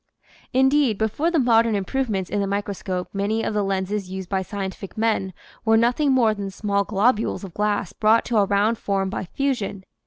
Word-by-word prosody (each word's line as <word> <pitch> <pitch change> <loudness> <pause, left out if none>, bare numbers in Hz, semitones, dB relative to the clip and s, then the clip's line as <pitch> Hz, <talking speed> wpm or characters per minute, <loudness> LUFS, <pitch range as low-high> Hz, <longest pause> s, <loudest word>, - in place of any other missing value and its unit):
Indeed, 265 -3 +3
before 220 +10 0
the 345 - 0
modern 230 -4 +3
improvements 200 -2 -2
in 205 - 0
the 200 - -1
microscope 195 -2 -3
many 205 +3 -1
of - - -2
the 210 - +1
lenses 195 0 -2
used 190 -1 -6
by 190 -1 0
scientific 195 +1 -6
men 215 -4 0 0.3
were 225 0 +4
nothing 245 +5 +2
more 240 -4 +4
than 200 -2 -5
small 200 +1 -1
globules 215 +2 +1
of 190 -3 -8
glass 205 -3 -1
brought 220 +2 +3
to 235 - 0
a 205 - +5
round 205 +3 +1
form 195 -1 -1
by 190 - -3
fusion. 220 -4 -2
210 Hz, 185 wpm, -23 LUFS, 195-230 Hz, 0.3 s, a